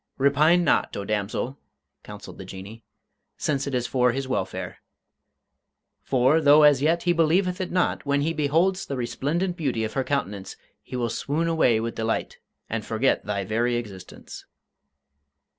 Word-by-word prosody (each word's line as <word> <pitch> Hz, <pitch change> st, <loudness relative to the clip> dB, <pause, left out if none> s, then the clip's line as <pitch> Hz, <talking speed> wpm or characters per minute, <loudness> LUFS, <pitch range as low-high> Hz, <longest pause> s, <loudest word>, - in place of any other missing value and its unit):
"Repine 150 Hz, +6 st, +4 dB
not, 160 Hz, -, +1 dB
O 100 Hz, -, -4 dB
damsel," 110 Hz, +6 st, -3 dB, 0.4 s
counselled -, -, -11 dB
the -, -, -6 dB
Jinnee, 100 Hz, +4 st, -10 dB, 0.5 s
"since 140 Hz, -2 st, -1 dB
it 135 Hz, -, -2 dB
is 125 Hz, -1 st, 0 dB
for 125 Hz, -1 st, +2 dB
his 135 Hz, +1 st, -3 dB
welfare. 130 Hz, -, -4 dB, 1.2 s
For, 135 Hz, +5 st, +2 dB
though 150 Hz, +1 st, +6 dB
as 145 Hz, -2 st, +6 dB
yet 165 Hz, +3 st, +2 dB
he 175 Hz, -, +2 dB
believeth 180 Hz, +3 st, +1 dB
it 185 Hz, -, -4 dB
not, 180 Hz, -1 st, 0 dB
when 140 Hz, 0 st, +1 dB
he 160 Hz, +3 st, 0 dB
beholds 165 Hz, +6 st, +1 dB
the 140 Hz, -, -4 dB
resplendent 155 Hz, +9 st, -2 dB
beauty 130 Hz, -9 st, -1 dB
of 110 Hz, -, -3 dB
her 135 Hz, -, 0 dB
countenance 105 Hz, -8 st, -3 dB, 0.3 s
he -, -, -9 dB
will 120 Hz, -2 st, -1 dB
swoon 150 Hz, +7 st, -1 dB
away 160 Hz, -9 st, +3 dB
with 115 Hz, +1 st, -3 dB
delight 110 Hz, 0 st, -3 dB, 0.3 s
and 115 Hz, -1 st, -3 dB
forget 115 Hz, +5 st, 0 dB
thy 100 Hz, -2 st, -2 dB
very 120 Hz, +4 st, 0 dB
existence." 100 Hz, -6 st, -8 dB
135 Hz, 160 wpm, -25 LUFS, 115-160 Hz, 1.2 s, though